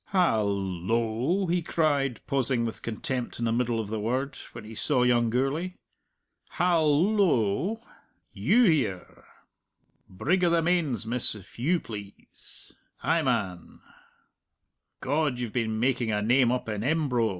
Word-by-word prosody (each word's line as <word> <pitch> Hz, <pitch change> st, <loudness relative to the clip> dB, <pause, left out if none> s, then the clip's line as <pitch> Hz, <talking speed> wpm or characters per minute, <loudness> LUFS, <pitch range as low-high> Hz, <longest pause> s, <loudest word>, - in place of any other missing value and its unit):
"Hal 165 Hz, -, +2 dB
lo!" 110 Hz, -, -1 dB
he 175 Hz, 0 st, 0 dB
cried, 145 Hz, -6 st, 0 dB
pausing 130 Hz, -3 st, +1 dB
with 115 Hz, -, -4 dB
contempt 120 Hz, +2 st, -4 dB
in 120 Hz, -, -2 dB
the 115 Hz, -, +1 dB
middle 120 Hz, -1 st, 0 dB
of 110 Hz, -2 st, -4 dB
the 110 Hz, 0 st, -3 dB
word, 130 Hz, +5 st, -2 dB, 0.2 s
when 115 Hz, -, -9 dB
he 110 Hz, +1 st, -10 dB
saw 125 Hz, +3 st, +2 dB
young 120 Hz, -2 st, +3 dB
Gourlay. 140 Hz, +10 st, -1 dB, 0.8 s
"Hal 170 Hz, +1 st, +2 dB
lo! 185 Hz, -, +1 dB, 0.5 s
You 245 Hz, +3 st, +3 dB
here! 140 Hz, -, 0 dB, 0.8 s
Brig 175 Hz, -, 0 dB
o' 175 Hz, -, +4 dB
the 165 Hz, -1 st, +2 dB
Mains, 160 Hz, -10 st, 0 dB
miss, 120 Hz, 0 st, +1 dB
if 100 Hz, +2 st, -14 dB
you 165 Hz, +8 st, +2 dB
please. 105 Hz, -6 st, -11 dB, 0.3 s
Ay, 165 Hz, +1 st, +2 dB
man! 100 Hz, -, -2 dB, 1.2 s
God, 145 Hz, -1 st, 0 dB
you've 120 Hz, -3 st, -4 dB
been 110 Hz, -3 st, -1 dB
making 125 Hz, -2 st, +1 dB
a 105 Hz, -, 0 dB
name 120 Hz, +2 st, +3 dB
up 125 Hz, -1 st, -2 dB
in 105 Hz, -1 st, -3 dB
Embro. 130 Hz, -5 st, +1 dB
125 Hz, 140 wpm, -27 LUFS, 110-160 Hz, 1.2 s, o